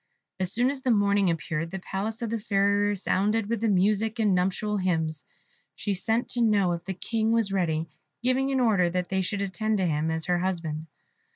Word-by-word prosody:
As 185 -1 0
soon 245 +5 +2
as 275 -2 -7
the 260 - -1
morning 200 -3 +3
appeared, 165 0 -2
the 190 - -5
palace 210 +5 -4
of 225 - -3
the 230 - -1
Fairy 200 -1 +2
resounded 205 +2 0
with 230 0 -2
music 210 +2 +2
and 215 -4 +2
nuptial 195 +3 0
hymns; 160 -5 -1 0.5
she 205 - -2
sent 225 +5 0
to 245 - -1
know 205 -5 +3
if 170 -1 -3
the 190 0 -4
King 225 +3 -1
was 225 -4 +1
ready, 165 -4 0 0.4
giving 260 +2 +2
an 270 -1 +1
order 205 -8 +3
that 180 0 -2
they 190 0 +1
should 200 +2 -2
attend 210 +3 -1
to 190 - +1
him 155 -1 0
as 160 0 -1
her 175 -1 +1
husband. 165 -4 -3
200 Hz, 200 wpm, -27 LUFS, 180-220 Hz, 0.5 s, morning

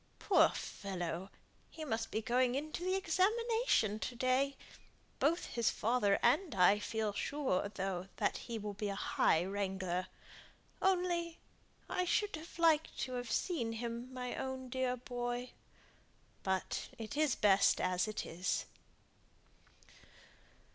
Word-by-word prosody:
Poor - - +5
fellow! 180 -2 -4 0.4
he 315 - -7
must 225 -4 -2
be 220 - -2
going 245 +2 +2
into 310 +4 -3
the 370 +1 +1
examination 410 - +2
to 245 - -4
day! 260 +3 +1 0.6
Both 330 +5 +2
his 235 -2 +1
father 220 -3 +2
and 290 - +3
I 195 +3 +6
feel 215 -1 -2
sure, 260 -6 -1
though, 190 -2 -3
that - - 0
he 230 - -2
will 210 -1 -4
be 205 +1 -3
a 200 - -2
high 165 -3 +2
wrangler. 190 -2 -2 0.7
Only 350 -3 +1 0.5
I 365 - 0
should 415 +2 +1 0.2
like 320 -2 +4
to 255 - -3
have 245 -2 -4
seen 240 -11 0
him, 235 +2 -4
my 250 -1 -4
own 260 -1 -4
dear 255 0 0
boy. 245 0 -4 0.9
But 190 -1 -2
it 225 +4 -6
is 300 -4 +2
best 200 -1 +4
as 185 +2 +1
it 215 0 -3
is." 180 +4 -1
240 Hz, 130 wpm, -35 LUFS, 200-295 Hz, 0.9 s, I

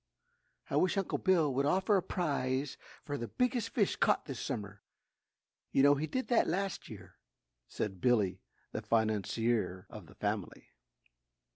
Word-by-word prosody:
"I - - +2
wish 185 +2 +2
Uncle 195 - -1
Bill 165 -7 +3
would 140 +2 +1
offer 190 +6 +3
a 190 - +3
prize 140 -6 -1 0.3
for 145 -1 -4
the 120 - -3
biggest 245 - 0
fish 220 -4 +1
caught - - +2
this 135 -6 -6
summer 105 -6 -5 0.9
you 135 - +4
know 145 0 +7
he 145 +2 -1
did 260 +6 -2
that 240 - +4
last 195 +3 -2
year," - - -11 0.5
said 95 -4 -4
Billy, 110 -7 +2 0.3
the - - -3
financier 110 -2 0
of - - -10
the - - -16
family. - - -3
140 Hz, 150 wpm, -33 LUFS, 115-190 Hz, 0.9 s, know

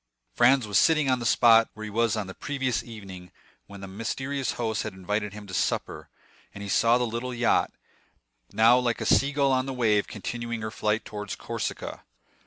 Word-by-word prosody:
Franz 125 0 +4
was 105 -1 +2
sitting 155 -4 +3
on 130 - +1
the 120 - -2
spot 115 -1 +5
where 110 - -8
he 110 - -5
was 115 +1 +1
on 105 - -2
the 95 - -8
previous 130 -1 -2
evening 95 -6 -11 0.4
when 100 0 -11
his 95 - -7
mysterious 130 +6 -3
host 110 -3 -2
had 110 - -5
invited 105 +2 -3
him 105 0 -9
to 95 - -11
supper; - - -2 0.5
and 100 - -7
he 100 - -6
saw 115 +3 +4
the 125 - 0
little 120 +2 -4
yacht, 120 0 +2 0.8
now 115 +3 +5
like 120 -2 -1
a - - -3
sea 140 +1 +3
gull 140 -1 +2
on 130 0 +1
the 135 - -3
wave, 110 -5 +2
continuing 115 +2 -5
her 110 - -4
flight 105 +1 -1
towards 105 -2 -6
Corsica. - - -5
115 Hz, 195 wpm, -26 LUFS, 105-125 Hz, 0.8 s, spot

